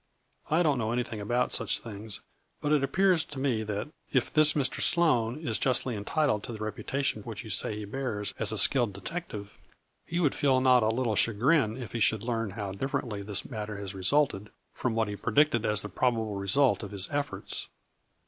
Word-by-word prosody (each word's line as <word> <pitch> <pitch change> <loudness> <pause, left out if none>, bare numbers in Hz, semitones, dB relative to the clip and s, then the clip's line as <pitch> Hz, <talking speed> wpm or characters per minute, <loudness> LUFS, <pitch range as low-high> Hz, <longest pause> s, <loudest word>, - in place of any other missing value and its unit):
I 160 +3 +3
don't 145 -6 +2
know 110 -1 -1
anything 120 -3 -2
about 120 +4 0
such - - +3
things, 105 -2 -8 0.4
but 150 - -1
it 150 -2 +3
appears 180 +4 +3
to 145 - -8
me 130 -5 0
that, 105 +4 -3 0.2
if 130 -3 +1
this 155 -1 +5
Mr. 135 -3 0
Sloane 125 -8 +2
is 110 - 0
justly 130 -2 0
entitled 105 +1 0
to - - -6
the 110 - -6
reputation 110 +3 -2
which 110 +2 -7
you 110 - -7
say 105 +2 0
he 105 0 -5
bears 105 -3 -3
as 110 0 +1
a 110 - -2
skilled 120 -2 +3
detective, 100 - -7 0.4
he 170 +1 -3
would 150 -6 +2
feel 135 -2 +2
not 130 -1 +5
a 110 - +2
little 115 -1 0
cha 115 - +2
grin 120 0 +2
if 125 -4 -7
he 120 - -3
should 110 -1 +2
learn 115 -2 -1
how 100 -3 -3
differently 105 -1 -3
this 100 0 -2
matter 105 -4 -5
has 100 -1 -6
resulted 105 +1 +1 0.2
from 125 -3 -2
what 110 -1 +1
he 105 - -4
predicted 120 +2 +2
as 105 -1 +3
the - - -5
probable 115 0 0
result 100 +8 +2
of 105 - -6
his 100 -1 -1
efforts. 145 0 -3
115 Hz, 200 wpm, -29 LUFS, 105-135 Hz, 0.4 s, this